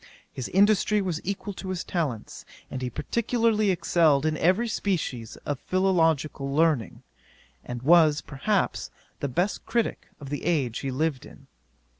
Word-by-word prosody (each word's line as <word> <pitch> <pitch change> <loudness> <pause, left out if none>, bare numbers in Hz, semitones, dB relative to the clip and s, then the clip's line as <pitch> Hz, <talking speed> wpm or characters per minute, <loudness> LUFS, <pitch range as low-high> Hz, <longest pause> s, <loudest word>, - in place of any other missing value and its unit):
His 130 - -4
industry 205 +2 +3
was 180 -5 -2
equal 200 +2 -4
to 190 0 -7
his 185 -1 -3
talents; 145 - -3 0.3
and 130 - -4
he 125 - -2
particularly 230 - +1
excelled 165 -5 +3
in 155 0 +1
every 190 +8 +2
species 160 - -2
of 145 -2 -2
philological 165 -7 +1
learning, 150 -5 +1 0.6
and 120 0 -6
was, 155 -1 +5
perhaps, 185 +9 -1 0.3
the 140 - -1
best 175 +10 -1
critick 235 0 -1
of 140 -3 -9
the 145 - -3
age 140 -9 0
he 135 - -3
lived 140 0 -1
in. - - -14
165 Hz, 145 wpm, -26 LUFS, 140-195 Hz, 0.6 s, was